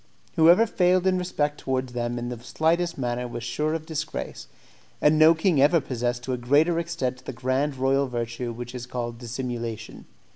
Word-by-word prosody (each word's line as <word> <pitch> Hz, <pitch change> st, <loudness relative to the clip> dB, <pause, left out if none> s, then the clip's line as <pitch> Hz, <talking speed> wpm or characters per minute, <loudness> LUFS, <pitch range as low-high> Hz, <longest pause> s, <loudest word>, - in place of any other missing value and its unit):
Whoever 175 Hz, +6 st, +6 dB
failed 185 Hz, -3 st, +2 dB
in 185 Hz, -1 st, +3 dB
respect 150 Hz, -5 st, -1 dB
towards 130 Hz, -1 st, -2 dB
them 120 Hz, 0 st, -2 dB
in 120 Hz, 0 st, -4 dB
the 120 Hz, -2 st, -6 dB
slightest 170 Hz, +7 st, 0 dB
manner 125 Hz, -1 st, -2 dB
was 120 Hz, -1 st, -6 dB
sure 150 Hz, +6 st, -1 dB
of 160 Hz, -1 st, -5 dB
disgrace, 155 Hz, -1 st, -5 dB, 0.5 s
and 155 Hz, +1 st, +4 dB
no 160 Hz, +1 st, +7 dB
king 160 Hz, -3 st, +2 dB
ever 155 Hz, +4 st, +5 dB
possessed 120 Hz, -3 st, -3 dB
to 130 Hz, -, -2 dB
a -, -, -1 dB
greater 150 Hz, +7 st, +3 dB
extent 135 Hz, -7 st, -3 dB
the 135 Hz, -, -5 dB
grand 130 Hz, +4 st, -1 dB
royal 135 Hz, +1 st, +2 dB
virtue 120 Hz, 0 st, -4 dB
which 120 Hz, +1 st, -7 dB
is 125 Hz, -1 st, -6 dB
called 120 Hz, -2 st, -4 dB
dissimulation. 120 Hz, -2 st, -5 dB
130 Hz, 180 wpm, -25 LUFS, 120-160 Hz, 0.5 s, no